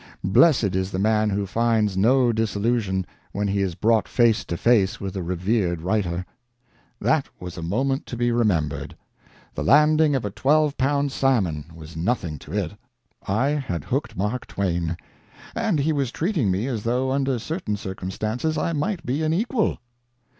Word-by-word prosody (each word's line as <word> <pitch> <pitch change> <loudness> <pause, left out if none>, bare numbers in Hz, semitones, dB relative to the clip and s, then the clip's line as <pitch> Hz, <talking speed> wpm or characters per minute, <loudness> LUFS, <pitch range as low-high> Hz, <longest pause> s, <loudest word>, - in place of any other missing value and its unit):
Blessed 100 - +4
is 95 0 0
the 95 - -4
man 105 +2 +2
who 100 0 -1
finds 110 -1 +1
no 120 +5 +4
disillusion 105 -3 0 0.3
when 100 0 -1
he 100 0 0
is 95 -3 -1
brought 110 +2 +2
face 115 -3 +3
to 85 - -3
face 105 -4 +3
with 100 0 -5
a 95 - -2
revered 90 0 -1
writer. 90 -2 -1 0.7
That - - +1
was 90 -1 -7
a 85 - -6
moment 130 - -1
to 120 - -5
be 120 0 +1
remembered; 80 - 0 0.6
the - - -3
landing 150 +1 +5
of 130 - -1
a 105 - -3
twelve 150 +6 +2
pound 140 +1 +1
salmon 95 - +1
was 80 0 -11
nothing 85 - -1
to 75 - -12
it. 100 -3 -1 0.6
I 110 +8 +1
had 130 - -2
hooked 120 - -3
Mark 105 +6 -2
Twain, 85 -4 -1 0.6
and 225 -7 0
he 155 +3 +1
was 140 -4 -1
treating 160 - 0
me 95 +5 0
as 120 -5 -2
though 125 +4 0
under 135 -1 +1
certain 115 - -3
circumstances 110 - -3
I 165 - 0
might 170 +3 -2
be 135 +5 -1
an 155 0 +1
equal. 225 +3 0
110 Hz, 170 wpm, -24 LUFS, 95-135 Hz, 0.7 s, landing